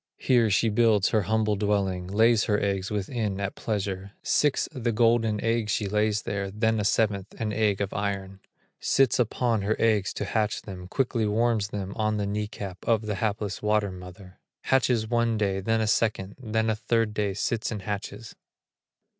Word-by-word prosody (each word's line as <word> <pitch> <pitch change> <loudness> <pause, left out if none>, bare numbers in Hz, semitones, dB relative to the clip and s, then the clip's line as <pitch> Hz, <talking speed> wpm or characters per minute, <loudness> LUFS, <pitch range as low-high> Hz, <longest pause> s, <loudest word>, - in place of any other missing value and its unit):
Here 120 -4 +3
she 110 +3 +2
builds 105 -2 +3
her 110 - +2
humble 110 +2 +1
dwelling, 100 -3 0
Lays 110 +3 +3
her 105 -2 +1
eggs 95 -1 -1
within, 105 0 -2
at 100 -1 -2
pleasure, 100 -2 -3
Six, 150 -2 +2
the 125 -5 -2
golden 115 -1 +2
eggs 115 -2 0
she 105 - 0
lays 105 +1 +1
there, 100 -1 -3
Then 110 +2 0
a - - 0
seventh, 100 -1 0
an 110 -2 -2
egg 105 -2 +1
of 100 - -2
iron; 100 -1 -3 0.4
Sits 135 -2 +2
upon 115 -1 +1
her 105 +3 0
eggs 110 -4 +2
to - - -3
hatch 110 -1 -1
them, 90 -3 -8
Quickly 120 0 0
warms 110 -1 +1
them 100 -2 -5
on 110 -1 0
the 105 - -1
knee 105 +1 -2
cap 100 -3 -7
Of 115 -2 +2
the 105 -1 -2
hapless 105 -3 -2
water 105 -1 +1
mother; 90 +1 -12 0.2
Hatches 125 -4 +2
one 120 -1 +1
day, 100 -2 0
then 110 +3 0
a - - +1
second, 105 -2 0
Then 110 -1 0
a - - 0
third 115 0 0
day 105 -2 -1
sits 110 +2 -1
and 105 -4 -5
hatches. 105 +2 -5
105 Hz, 180 wpm, -26 LUFS, 100-115 Hz, 0.4 s, Here